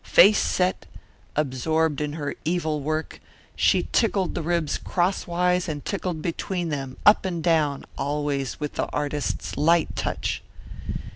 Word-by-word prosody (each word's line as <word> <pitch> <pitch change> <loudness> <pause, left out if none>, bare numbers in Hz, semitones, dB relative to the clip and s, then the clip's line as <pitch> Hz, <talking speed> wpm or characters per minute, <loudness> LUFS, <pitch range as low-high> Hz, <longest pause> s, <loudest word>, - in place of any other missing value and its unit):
Face 205 +3 +6
set, 185 0 0 0.5
absorbed 150 +2 +1
in 150 -1 -2
her 145 -3 -3
evil 160 -2 0
work, 155 +2 -3 0.3
she - - +3
tickled 200 -6 +2
the - - -2
ribs 165 -2 0
crosswise 180 0 0
and 145 -2 -5
tickled 180 -5 -3
between 175 0 -2
them, 135 -3 -4
up 210 - +7
and 175 -4 -3
down, 155 -5 +2
always 140 -1 -1
with 150 -1 -3
the - - -1
artist's 145 -1 -2
light 165 +3 +3
touch. - - -2
160 Hz, 135 wpm, -25 LUFS, 145-175 Hz, 0.5 s, up